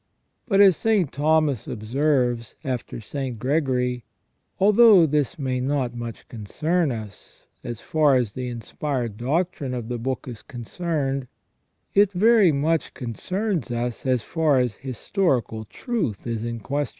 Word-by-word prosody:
But, 200 -4 +4
as 195 -3 +7
St. 210 -9 +1
Thomas 150 -4 +1
observes 120 0 0
after 125 -3 -4
St. 130 +2 -5
Gregory, 125 -2 0 0.6
although 205 -2 +7
this 150 -1 0
may 130 -3 -1
not 130 -2 -1
much 120 -1 -7
concern 155 - -1
us, 110 -4 -9 0.2
as 120 -3 -5
far 150 -3 +3
as 120 -5 0
the 125 -1 -4
inspired 120 0 -3
doctrine 140 - -1
of 120 -2 -5
the 120 -1 -3
book 130 +3 -3
is 120 -4 -7
concerned, 135 +1 -3 0.7
it 200 0 +4
very 210 -1 +5
much 155 +2 0
concerns 180 - -3
us 120 -1 -3
as 125 -4 +1
far 160 -4 +1
as 125 -3 0
historic 135 - -1 0.2
truth 205 - -3
is 115 -1 -3
in 115 -1 -4
question. 145 +6 -2
135 Hz, 140 wpm, -24 LUFS, 120-160 Hz, 0.7 s, as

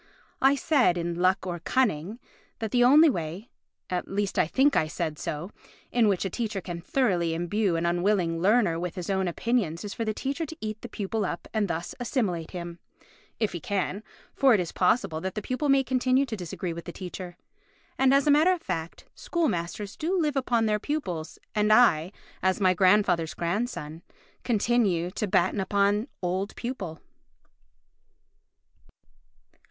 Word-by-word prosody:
I 270 +1 +5
said 270 - +2
in 170 0 -2
Luck 185 +2 +1
or 175 -2 -4
Cunning? 210 -3 0 0.4
that 220 -2 -4
the 245 -1 +4
only 295 +6 +7
way 175 - -3 0.4
(at 180 -1 -3
least 200 0 -1
I - - +3
think 275 - +3
I 155 - +2
said 155 0 -3
so) 155 +6 -4 0.4
in 235 -3 +3
which 195 -2 +1
a - - -1
teacher 215 -2 -2
can 175 -2 -6
thoroughly 175 -7 +1
imbue 185 +2 0
an 165 +1 -1
unwilling 175 -1 +1
learner 200 -4 +3
with 180 0 -4
his 180 +1 -4
own 190 -1 0
opinions 190 -2 -1
is 205 - -5
for 230 - -3
the 215 - 0
teacher 280 +5 -2
to 320 - -9
eat 215 0 -5
the 240 - -8
pupil 215 +1 -2
up 175 -3 -4
and 215 -2 +1
thus 170 0 -4
assimilate 205 - -1
him—if 175 +4 -7
he 175 - -5
can, 200 +3 -2 0.3
for 265 -4 +5
it - - +1
is 175 -2 -2
possible 180 -4 +1
that 190 +1 -4
the - - -1
pupil 255 +5 -1
may 275 0 +5
continue 255 +1 +2
to 235 -4 -4
disagree 180 -2 -5
with 170 0 -8
the - - -6
teacher. 180 -1 -8 0.6
And 265 0 +3
as 275 0 +4
a 295 - +5
matter 315 +6 +5
of 355 - -5
fact, 165 0 -5
school 340 -3 -1
masters 180 +4 -4
do 360 +4 -1
live 300 -4 0
upon 240 -4 +1
their 210 -1 +1
pupils, 190 - -4 0.2
and 210 0 +2
I, 185 -8 +5 0.3
as 190 +2 +1
my 185 -2 +4
grandfather's 185 -3 +3
grandson, 170 -4 -3 0.4
continue 210 -7 +1
to 210 +2 -2
batten 185 +2 +2
upon 200 +3 +1 0.2
old 185 +3 -2
pupil. 200 -10 -5
200 Hz, 170 wpm, -27 LUFS, 175-245 Hz, 0.6 s, only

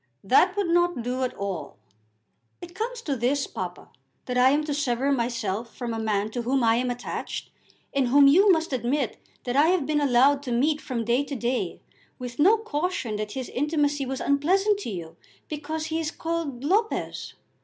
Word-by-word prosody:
"That 355 - +4
would 405 - +1
not 345 -6 +2
do 250 +2 -2
at 255 - -1
all." 185 - -5 0.8
"It 350 0 -10
comes 465 +4 -4
to 285 - -1
this, 265 +4 0
papa, - - -6 0.4
that 250 - -3
I 250 +1 +6
am 295 +3 +2
to 300 -1 -2
sever 275 -1 0
myself 230 -3 -2
from 240 -3 -4
a 225 - -3
man 215 -1 -1
to 240 - -3
whom 255 +2 +1
I 225 0 +4
am 250 +1 0
attached, 245 0 -5 0.4
and 275 -2 +2
whom 280 +3 +6
you 380 +8 +6
must 325 -4 +1
admit 255 +1 -1 0.3
that 245 0 -3
I 290 +3 +5
have 355 -5 +2
been 300 +1 +1
allowed 275 +1 +4
to 265 -3 -5
meet 295 +6 +1
from 235 -4 -3
day 240 +4 +2
to 280 - -5
day 245 +1 -2 0.4
with 245 0 -7
no 395 +9 +6
caution 320 - -2
that 210 0 -4
his 260 -2 -4
intimacy 290 -1 0
was 265 0 -3
unpleasant 380 +9 +2
to 405 - -5
you, 170 -5 -7 0.3
because 310 +1 -4
he 320 0 -2
is 320 -2 -1
called 325 -6 -4
Lopez." 415 +9 -1
275 Hz, 190 wpm, -26 LUFS, 240-315 Hz, 0.8 s, I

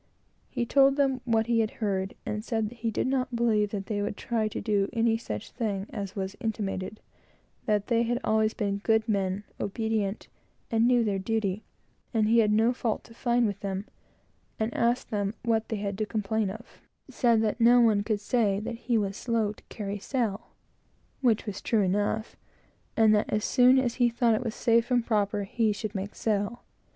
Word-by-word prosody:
He 245 -2 -2
told 275 +2 +4
them 270 -3 +1
what 225 -2 +2
he 235 0 +2
had 220 -1 +2
heard, 195 -3 -1
and 210 0 -3
said 220 -2 -1
that 240 - -14
he 230 - -1
did 220 - -1
not 255 -1 -1
believe 220 -3 +2
that 200 -2 -4
they 205 -1 -2
would 205 0 -3
try 225 -2 -1
to 215 - -4
do 205 -3 +1
any 230 0 +2
such 105 - -6
thing 205 -5 -2
as 200 -2 -5
was 190 -1 -4
intimated; 210 -3 -3 0.7
that 210 -2 +2
they 235 -2 +2
had 240 +1 0
always 220 0 +2
been 200 -2 -1
good 220 +1 +2
men, 195 -2 0 0.2
obedient, 215 -1 -2 0.4
and 225 +1 +3
knew 245 -1 +4
their 200 -3 0
duty, 205 -1 -1 0.5
and 215 -1 +3
he 230 +2 +5
had 210 -2 +4
no 225 +3 +3
fault 235 -3 -2
to 230 - -15
find 240 0 +1
with 200 -2 -2
them; 195 -1 -3 0.7
and 220 +1 -1
asked 235 +2 0
them 205 0 -1
what 225 -1 +1
they 225 - -1
had 200 0 -4
to 215 - -1
complain 215 -1 -1
of 220 +5 -11 0.3
said 235 -3 +2
that 220 +2 -1
no 240 +2 +7
one 220 -4 +4
could 210 0 -1
say 205 -2 +1
that 225 +2 -5
he 235 0 0
was 200 -2 -1
slow 225 -2 0
to - - -20
carry 205 -1 -5
sail, 225 -3 -2 0.7
(which 235 -5 +2
was 205 -3 -5
true 225 -3 +1
enough;) 205 +3 -1 0.6
and 220 -1 +6
that, 210 - +1
as 210 0 0
soon 255 +1 +5
as 250 -3 +1
he 240 - +5
thought 235 0 +2
it 220 - 0
was 230 -2 -4
safe 230 0 +2
and 245 -2 +2
proper, 205 -2 0
he 220 +2 0
should 210 0 -4
make 200 0 -5
sail. 215 +2 -1
220 Hz, 200 wpm, -28 LUFS, 205-235 Hz, 0.7 s, no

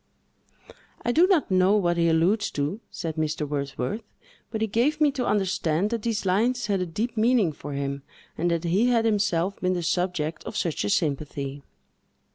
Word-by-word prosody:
"I 240 - +2
do 335 +8 +5
not 360 - +2
know 185 +3 +4
what 175 -4 +1
he 170 -1 +2
alludes 175 +7 +2
to," 145 +9 -2
said 160 -1 -5
Mr. 155 -1 -1
Wordsworth; 140 - -3 0.5
"but 220 -1 -4
he - - +3
gave 245 +8 +1
me 300 -2 +4
to 260 -2 -2
understand 190 -2 +1
that 230 -2 -1
these 220 -2 -2
lines 230 +6 +1
had 200 -3 0
a 180 - -2
deep 220 +8 -3
meaning 220 -5 +3
for 145 -1 -8
him, 140 0 -3 0.3
and 175 +2 0
that 170 -1 0
he 190 +8 +2
had 235 -2 +3
himself 200 -4 +1
been 185 0 +1
the 175 -1 -2
subject 175 -3 -1
of 215 - -5
such 170 -7 -1
a 100 - -1
sympathy." 140 0 -1
185 Hz, 185 wpm, -25 LUFS, 160-220 Hz, 0.5 s, do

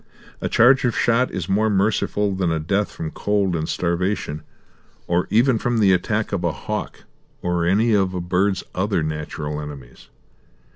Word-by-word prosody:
A - - -1
charge 135 +4 +5
of 125 -2 0
shot 120 +2 +2
is 90 -4 -4
more 105 +3 +2
merciful 105 0 +1
than 95 -3 0
a 80 - 0
death 100 +6 -1
from 80 -1 -6
cold 100 -3 0
and 80 -1 -2
starvation, 85 -3 -1 0.6
or 85 +1 0
even 120 +2 +3
from 120 +1 0
the 100 -4 +4
attack 105 +4 0
of 95 -3 -1
a 85 - +1
hawk 70 - -5 0.4
or 85 -1 0
any 110 +5 +3
of 95 -2 +1
a - - -1
bird's 95 +2 0
other 95 -3 0
natural 75 -1 -4
enemies. 70 -5 -10
95 Hz, 165 wpm, -22 LUFS, 85-105 Hz, 0.6 s, charge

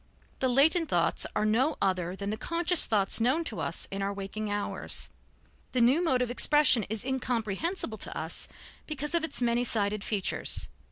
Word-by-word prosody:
The 260 - +1
latent 315 +6 +3
thoughts - - +1
are 210 - +1
no 255 +8 +2
other 185 -2 -1
than 200 +1 -4
the - - -2
conscious 335 +7 +1
thoughts 205 0 +2
known 260 +8 +2
to - - -5
us - - -2
in 195 0 -4
our 195 0 -1
waking 200 +2 -5
hours; 205 0 -4 0.6
the 255 - +1
new 260 +9 +4
mode 260 -7 +2
of 245 - -3
expression 285 -1 +5
is 220 +2 -2
incomprehensible 250 - -2
to - - -4
us - - -4 0.4
because 295 0 -4
of 340 -1 +2
its 295 -5 0
many 240 0 +2
sided 210 -3 0
features. 205 -4 -1
240 Hz, 175 wpm, -28 LUFS, 205-295 Hz, 0.6 s, expression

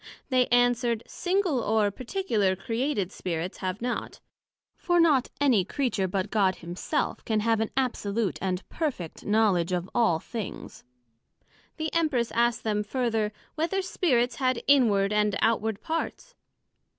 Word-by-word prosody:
They 255 -2 +3
answered, 245 -1 +2
Single 360 -6 0
or 215 -2 +2
particular 230 - 0
created 225 0 -2
Spirits, 175 0 -4
have 185 +4 -3
not; 245 0 -3 0.6
for 350 -1 +1
not 295 -7 +4
any 255 -9 +4
Creature, 220 -3 -1
but 185 0 -2
God 195 -4 +2
Himself, 175 +1 -3
can 220 -2 0
have 225 0 +2
an 220 - 0
absolute 225 -5 -1
and 185 -1 -2
perfect 265 - -4
knowledg 205 -5 +2
of 180 0 -1
all 225 -9 +3
things. 220 +3 -7 0.9
The 315 -1 -3
Empress 300 -8 +1
asked 235 0 +1
them 210 -1 0
further, 225 -2 -1 0.2
Whether 340 +5 -1
Spirits 255 -10 +1
had 255 -3 0
inward 210 -8 +4
and 210 -1 +2
outward 220 -2 +1
parts? 330 +9 -4
230 Hz, 135 wpm, -27 LUFS, 200-260 Hz, 0.9 s, not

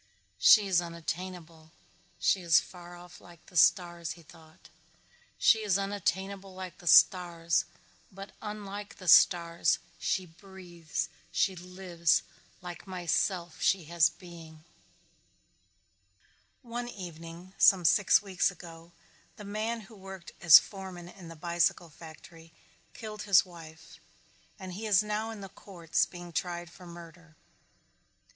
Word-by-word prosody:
"She 210 -2 +7
is 185 -3 +2
unattainable, 170 -1 -7 0.5
she 190 - +1
is 170 -3 +5
far 175 -1 -12
off 175 0 -14
like 175 -1 -17
the 180 - -18
stars," 170 -2 +2
he 170 0 -17
thought. 160 0 -18 0.7
"She 225 - +4
is 205 -3 +1
unattainable 195 -1 -3
like 185 -1 -9
the 175 - -13
stars 170 -1 +4 0.5
but 195 +1 -10
unlike 205 -1 -7
the 185 - -12
stars 170 0 +4 0.2
she 185 - -1
breathes, 175 -2 -7 0.2
she 185 +2 +1
lives, 180 -2 -1 0.4
like 175 +2 -9
myself 175 -1 -2
she 190 -2 +2
has 170 -1 +5
being." 165 -2 -14 2.0
One 240 0 -5
evening, 175 -2 -10
some 185 -3 +5
six 205 +6 +4
weeks 190 -2 0
ago, 170 -2 -13 0.4
the 210 - -11
man 220 +3 -3
who 215 +2 -15
worked 190 -2 -11
as 165 -5 +10
foreman 190 -3 -6
in 180 -2 -13
the 165 - -10
bicycle 170 +1 -1
factory 165 +1 -14 0.4
killed 215 -1 -8
his 195 -2 +6
wife 165 -3 -14 0.6
and 190 -3 -8
he 215 +4 -6
is 205 -1 +4
now 210 +1 -3
in 220 -2 -8
the 195 - -9
courts 175 -4 -2
being 175 -1 -10
tried 175 0 -4
for 180 0 -14
murder. 170 -1 -13
175 Hz, 130 wpm, -29 LUFS, 170-195 Hz, 2.0 s, as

